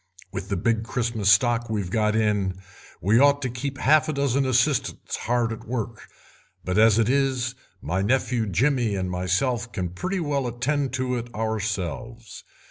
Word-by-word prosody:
With 100 0 -6
the 100 - -1
big 115 +4 +1
Christmas 115 -3 -1
stock 120 +3 +3
we've 100 -5 -2
got 105 0 +1
in 105 -4 +1 0.5
we 105 +5 +4
ought 145 +1 +5
to 125 - -2
keep 135 +3 -4
half 155 +3 +3
a - - 0
dozen 140 -1 +1
assistants 130 +1 0
hard 120 -1 0
at 110 - -10
work, 115 -1 -4 0.6
but 90 +3 +1
as 110 -1 +6
it 115 -2 +3
is 130 -2 +1 0.3
my 90 +6 -1
nephew 120 +1 +1
Jimmy 120 - +1
and 95 -1 -2
myself 115 +7 -1
can 90 -3 -3
pretty 185 - -3
well 145 -5 -1
attend 130 +3 -1
to 130 -1 -1
it 120 0 -6
ourselves. 110 0 -4
115 Hz, 165 wpm, -24 LUFS, 105-130 Hz, 0.6 s, as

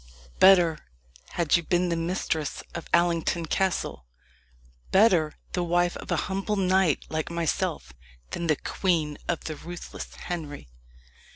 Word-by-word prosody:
Better 175 -4 +6 0.5
had 170 -4 +2
you 170 - +3
been 175 +2 +1
the 170 - +1
mistress 165 -3 -2
of 170 - -6
Allington 170 -1 +2
Castle 160 - -1 0.8
better 185 -7 +4 0.2
the 180 - -1
wife 175 +1 +1
of - - -10
a - - +2
humble 195 +2 -1
knight 190 -4 +2
like 155 -1 -2
myself, 160 - -2 0.4
than 170 - -3
the 155 - +4
queen 160 -3 -1
of 170 - -1
the 155 - -4
ruthless 175 +3 -8
Henry." 150 - -6
170 Hz, 130 wpm, -27 LUFS, 155-180 Hz, 0.8 s, Better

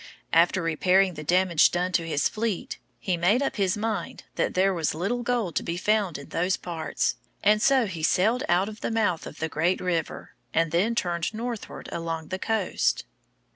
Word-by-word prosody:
After 170 +2 +4
repairing 180 +3 +3
the 155 -1 -7
damage 175 0 +4
done 180 +1 -1
to 170 -2 0
his 150 -3 +1
fleet, 220 -3 -3 0.2
he 185 -3 -1
made 200 +10 +3
up 275 - -2
his 195 -1 +1
mind 220 0 -3
that - - -1
there 190 +1 +3
was 160 -4 -1
little 200 +9 -1
gold 240 -7 -1
to - - +2
be 170 - -3
found 205 -3 +1
in 140 - -11
those 180 +2 0
parts, 165 -3 -2 0.3
and 210 +1 +4
so 265 -1 +4
he 175 -5 -5
sailed 215 +10 +2
out 180 +3 +3
of 215 0 -9
the - - -1
mouth 210 -7 0
of - - -10
the 160 - -2
great 165 +4 0
river, 170 -3 -3 0.2
and 165 -1 +2
then 200 +8 +2
turned 175 -1 -1
northward 235 -1 -5
along 165 -2 -4
the 185 - -3
coast. 190 - 0
185 Hz, 190 wpm, -26 LUFS, 165-215 Hz, 0.3 s, After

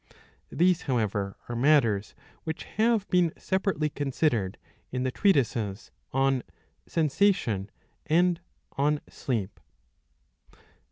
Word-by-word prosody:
These 180 0 +3
however 105 -5 0
are 120 - -4
matters 120 -6 +3 0.3
which 160 0 -4
have 220 -2 +1
been 180 -3 +3
separately 190 -5 0
considered 135 - 0 0.3
in 125 0 -2
the 130 - 0
treatises 120 - +1 0.2
on 135 -1 +2 0.5
Sensation 150 - +1 0.4
and 175 +2 +3 0.3
on 145 +2 +1
Sleep. 110 -7 -3
140 Hz, 95 wpm, -28 LUFS, 115-170 Hz, 0.5 s, These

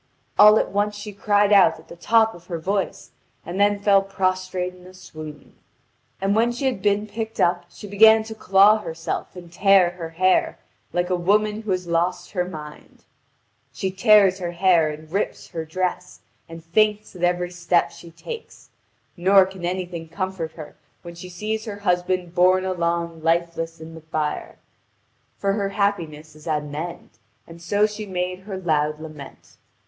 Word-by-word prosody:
All 210 +1 +9
at - - 0
once 205 +1 0
she 205 0 -8
cried 205 +1 +2
out 185 -5 +6
at 160 - -17
the - - -11
top 225 +5 +3
of 175 0 -15
her 170 - -4
voice, 195 +4 -3 0.3
and 175 +3 -5
then 205 0 +3
fell 200 -1 +4
prostrate 185 -1 -2
in 180 0 -16
a 185 - -14
swoon. 155 -4 -11 0.7
And 195 +1 +1
when 230 +2 +3
she 245 +3 -4
had 255 -8 -1
been 205 +1 +1
picked 220 +1 -6
up 175 0 +2
she 190 - -12
began 220 +2 +6
to 220 0 -8
claw 205 0 +5
herself 165 -1 -5
and 175 -2 -11
tear 195 -2 +4
her 170 -2 -7
hair, 185 +3 +1 0.3
like 175 +1 -1
a - - +3
woman 210 +4 +1
who 220 - -9
had 185 -1 -1
lost 170 +2 -1
her 180 -3 0
mind. 155 -4 -10 0.7
She 190 -2 -3
tears 195 -1 +5
her 175 -1 -4
hair 170 -3 +3
and 155 +1 -9
rips 200 +3 -3
her 165 -3 -5
dress, 180 +2 -3 0.3
and 165 0 -10
faints 210 +4 +1
at 175 - -10
every 175 0 0
step 175 -1 +1
she 170 - -13
takes; 445 - -10 0.4
nor 190 +2 +5
can 190 -1 -10
anything 175 -2 -4
comfort 185 -2 -4
her 155 -3 -10 0.3
when 170 -1 -9
she 175 +2 -10
sees 215 +5 -4
her 205 -3 -6
husband 180 -2 -1
borne 185 +1 +3
along 170 -2 -2
lifeless 165 0 -1
in 160 +1 -10
the 160 - -11
bier; 155 -1 -4 0.8
for 195 0 0
her 200 -1 -1
happiness 165 -7 -2
is 155 +1 -14
at 150 -2 0
an 145 -1 -9
end, 170 +3 -6 0.4
and 165 0 -13
so 205 +5 +2
she 210 0 -5
made 180 -1 -3
her 190 0 -7
loud 150 -4 0
lament. 155 -3 -11
185 Hz, 175 wpm, -23 LUFS, 170-200 Hz, 0.8 s, All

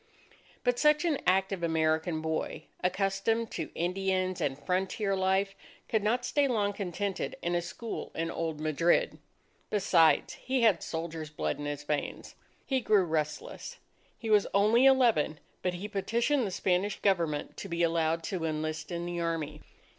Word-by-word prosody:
But 245 -1 +1
such 300 +2 +4
an 310 -5 +1
active 190 0 +2
American 160 0 +1
boy, 160 0 -3 0.2
accustomed 195 +5 0
to 160 - -4
Indians 185 +1 0
and 135 -2 0
frontier 190 +6 -1
life, 190 +1 +1 0.3
could 220 - +1
not 240 +4 +1
stay 290 -1 +2
long 210 -5 +1
contented 195 0 -3
in 175 - 0
a 175 - +2
school 225 +6 -6
in 165 +1 -2
old 160 -2 -3
Madrid. 155 +2 +2 0.5
Besides, 180 -6 +3
he 260 -1 0
had 210 -7 +4
soldiers' 160 -1 -4
blood 150 - -2
in 145 - -4
his 145 0 -4
veins. 145 0 -3 0.3
He 265 -2 0
grew 210 -4 +4
restless. 155 -3 -3 0.4
He 225 -3 -4
was 210 -2 +5
only 215 +6 +5
eleven; 230 - +4 0.2
but 180 -1 -1
he 190 +4 -5
petitioned 230 +6 0
the - - -2
Spanish 190 +2 0
Government 170 -7 0
to 200 - -6
be 170 0 0
allowed 165 0 +1
to 180 -2 -3
enlist 155 +1 -3
in 170 0 -3
the 175 0 -3
army. 160 -3 -2
185 Hz, 155 wpm, -30 LUFS, 160-210 Hz, 0.5 s, was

